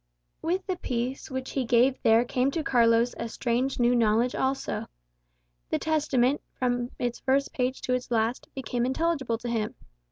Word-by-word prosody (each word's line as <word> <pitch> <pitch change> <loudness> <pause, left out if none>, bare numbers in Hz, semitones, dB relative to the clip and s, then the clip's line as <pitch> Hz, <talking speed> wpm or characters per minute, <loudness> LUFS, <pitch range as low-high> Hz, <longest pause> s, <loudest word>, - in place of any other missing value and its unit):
With 360 +4 -1
the 370 -2 -2
peace 250 -2 -3
which 260 0 -4
he 270 - -1
gave 245 +2 +3
there 225 +2 +5
came 250 +2 +1
to 315 +3 -2
Carlos 235 -2 +3
a 230 - -3
strange 250 +4 -1
new 240 0 +4
knowledge 235 +1 +3
also. 265 +1 -1 0.8
The - - +1
Testament, 290 -4 +1 0.2
from 245 -1 0
its 245 -1 -2
first 275 +1 +1
page 255 0 -1
to 250 - -1
its 250 0 -2
last, 230 +1 0
became 250 -2 -2
intelligible 265 -4 0
to 240 - -7
him. 225 -2 -2
250 Hz, 165 wpm, -27 LUFS, 235-270 Hz, 0.8 s, there